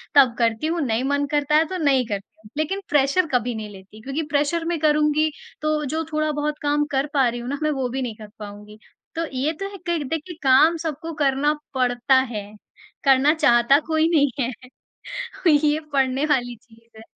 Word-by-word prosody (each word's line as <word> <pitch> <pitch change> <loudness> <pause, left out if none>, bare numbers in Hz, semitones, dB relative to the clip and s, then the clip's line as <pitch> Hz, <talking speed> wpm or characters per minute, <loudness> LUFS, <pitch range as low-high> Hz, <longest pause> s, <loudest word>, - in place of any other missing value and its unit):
तब 260 -4 +6
करती 230 +5 +1
हूँ, 335 0 -1
नहीं 240 -2 0
मन 285 +1 0
करता 295 0 +1
है 315 +1 +5
तो 375 - -4
नहीं 270 -3 +3
करती 200 -2 -6
हूँ। - - -13
लेकिन 385 +6 -1
प्रेशर 290 +5 +2
कभी 245 -1 0
नहीं 215 -1 -6
लेती 200 +2 -14
क्योंकि 275 +7 -3
प्रेशर 295 +4 +1
मैं 335 -1 -1
करुँगी 300 0 +2 0.3
तो 305 0 0
जो 315 +4 -2
थोड़ा-बहुत 300 -1 -1
काम 295 0 +1
कर 270 +1 0
पा 270 -3 +3
रही 240 - -5
हूँ 240 +1 -6
ना, 280 - -2
मैं 305 - +2
वो 265 -3 -1
भी 265 +2 -3
नहीं 235 -4 -4
कर 215 -1 -11
पाऊँगी। 210 0 -10 0.4
तो 330 - -1
ये 275 +5 0
तो 390 - -3
है 400 - -9
कि 335 -3 0
देखिए 325 +5 -5
काम 290 +6 +5
सबको 320 0 -5
करना 275 +2 +2 0.2
पड़ता 250 +1 +2 0.2
है, 210 -2 -4 0.6
करना 275 +2 +5
चाहता 275 -3 +4
कोई 315 0 +2
नहीं 285 -2 +4
है। 255 0 -6 0.7
ये 295 +1 +2
पड़ने 270 0 +1
वाली 245 -5 0
चीज़ 230 0 -22
है। - - -11
280 Hz, 195 wpm, -22 LUFS, 245-305 Hz, 0.7 s, तब